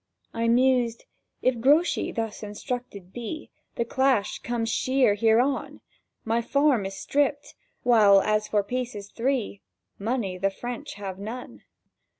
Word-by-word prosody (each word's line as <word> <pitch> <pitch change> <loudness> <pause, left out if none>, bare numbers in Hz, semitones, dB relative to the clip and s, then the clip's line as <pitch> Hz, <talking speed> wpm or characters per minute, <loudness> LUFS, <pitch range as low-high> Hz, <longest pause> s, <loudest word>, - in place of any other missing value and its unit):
I 230 0 0
mused: 245 -1 +2 0.4
"If 255 -2 +2
Grouchy 295 +8 +3
thus 225 -2 -4
instructed 210 -3 -6
be, 240 +6 -6 0.2
The 235 - -1
clash 260 -4 +1
comes 235 -1 -2
sheer 255 -4 +2
hereon; 230 +6 +1 0.5
My 230 +1 +1
farm 275 -5 +2
is 195 - -8
stript. 285 0 0 0.3
While, 215 -5 +6
as 215 +1 +1
for 205 -1 +1
pieces 225 -3 -4
three, 240 -5 -1 0.4
Money 205 -4 -2
the 195 +1 +2
French 240 +5 -6
have 195 -2 -6
none. 230 +5 -7
230 Hz, 130 wpm, -26 LUFS, 205-255 Hz, 0.5 s, While